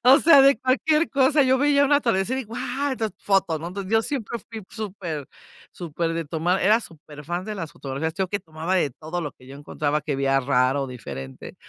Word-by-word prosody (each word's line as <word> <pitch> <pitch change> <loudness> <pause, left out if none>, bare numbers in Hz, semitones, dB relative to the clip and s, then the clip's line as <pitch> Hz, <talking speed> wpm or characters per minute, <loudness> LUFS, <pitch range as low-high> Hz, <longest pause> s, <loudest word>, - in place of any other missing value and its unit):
o 260 +3 +7
sea, 315 -4 +7
de 275 -4 +5
cualquier 300 +6 +2
cosa, 280 +2 +3
yo 260 0 +3
veía 285 +1 +3
un 285 - +1
atardecer, 245 -3 +1
y - - -2
guau, 245 +5 -3
estas 225 -6 -2
fotos, 190 -5 +1
¿no?, 165 - -5
entonces, 195 +2 -6
yo 225 0 +4
siempre 235 -3 -4
fui 225 -1 -7
súper 180 - -6 0.4
súper 165 -1 -3
de 165 0 -2
tomar, 165 +5 0
era 215 +4 +4
súper 150 -6 -12
fan 175 +3 -3
de 215 - -5
las 165 -6 -5
fotografías, 140 +4 -4
yo 190 0 -1
que 205 +2 -3
tomaba 160 +2 -4
de 170 -6 +2
todo 160 +7 -6
lo 150 -4 -4
que 130 - -20
yo 135 - -11
encontraba 145 +1 -2
que 145 -3 -3
veía 135 0 +2
raro, 135 +1 +1
diferente, 65 - -8
185 Hz, 210 wpm, -24 LUFS, 150-245 Hz, 0.4 s, o